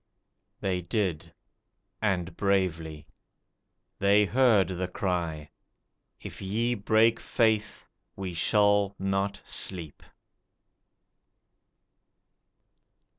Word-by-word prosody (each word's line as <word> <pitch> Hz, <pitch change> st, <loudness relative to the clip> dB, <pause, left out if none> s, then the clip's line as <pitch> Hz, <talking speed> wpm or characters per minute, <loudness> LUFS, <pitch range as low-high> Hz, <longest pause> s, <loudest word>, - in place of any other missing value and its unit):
They 95 Hz, -3 st, -1 dB
did 90 Hz, -3 st, -2 dB, 0.7 s
and 95 Hz, -4 st, -1 dB
bravely. 85 Hz, -6 st, -1 dB, 0.9 s
They 100 Hz, +1 st, +4 dB
heard 110 Hz, -3 st, +3 dB
the 90 Hz, 0 st, -3 dB
cry 85 Hz, -5 st, -3 dB, 0.7 s
"If -, -, -9 dB
ye 110 Hz, +5 st, 0 dB
break 110 Hz, +1 st, +3 dB
faith, 110 Hz, -2 st, 0 dB, 0.3 s
we 95 Hz, -2 st, -5 dB
shall 100 Hz, +2 st, +2 dB
not 95 Hz, +1 st, -1 dB
sleep." 85 Hz, -6 st, -4 dB
95 Hz, 75 wpm, -28 LUFS, 90-105 Hz, 0.9 s, They